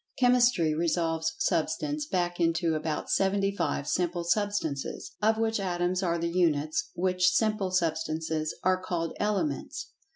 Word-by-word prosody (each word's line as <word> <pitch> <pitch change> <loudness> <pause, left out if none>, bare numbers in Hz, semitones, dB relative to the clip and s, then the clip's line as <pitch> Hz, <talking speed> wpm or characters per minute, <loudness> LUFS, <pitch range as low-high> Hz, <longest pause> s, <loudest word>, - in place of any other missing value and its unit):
Chemistry 245 -10 +4
resolves 165 0 0
Substance 290 - -1
back 175 -4 -1
into 165 0 +2
about 155 0 -2
seventy 195 +1 +1
five 145 -7 -1
simple 175 -1 0
substances, 175 -6 -1
of 220 +1 +3
which 225 -1 0
Atoms 180 -1 0
are 170 -2 0
the 170 0 -1
Units, 155 -3 +1
which 180 0 +2
simple 215 -3 +1
substances 160 -2 -1
are 185 0 +2
called 165 -3 -2
"Elements." 210 - -2
175 Hz, 130 wpm, -28 LUFS, 160-200 Hz, -, Chemistry